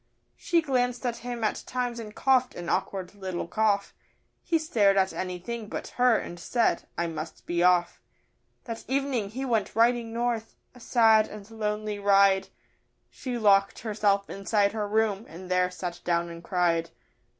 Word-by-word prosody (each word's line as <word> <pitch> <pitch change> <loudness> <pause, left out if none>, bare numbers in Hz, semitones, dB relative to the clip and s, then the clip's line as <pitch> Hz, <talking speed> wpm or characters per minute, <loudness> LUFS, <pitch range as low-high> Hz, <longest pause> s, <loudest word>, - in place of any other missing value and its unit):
She 335 -1 +1
glanced 250 -3 0
at 240 -1 -1
him 240 -1 -5
at 215 - 0
times 245 -2 -2
and 215 -2 -8
cough'd 255 -2 +2
an 175 -1 -6
awkward 190 -2 -2
little 190 -4 -5
cough; 205 0 +1 0.5
He 335 - +1
stared 210 -11 +2
at 190 0 +2
anything 190 +5 -5
but - - -5
her 245 -2 +3
and 175 - -6
said, 230 -1 0
'I 170 - 0
must 160 -1 -6
be 175 0 -1
off.' 175 -1 +3 0.6
That 230 -2 -6
evening 265 -5 -1
he 260 +6 -4
went 225 -6 0
riding 235 0 +3
north 230 -1 -2 0.2
a 250 - -15
sad 225 -3 +4
and 205 -1 -10
lonely 210 -1 -3
ride 195 -1 +4 0.6
She 250 -2 -5
locked 200 -3 +4
herself 205 -2 +1
inside 200 +1 +1
her 215 -2 -2
room, 215 0 0
and 180 +3 -9
there 180 0 +3
sat 180 -1 -6
down 170 0 0
and 170 0 -9
cried. 170 -2 +1
210 Hz, 160 wpm, -27 LUFS, 185-235 Hz, 0.6 s, sad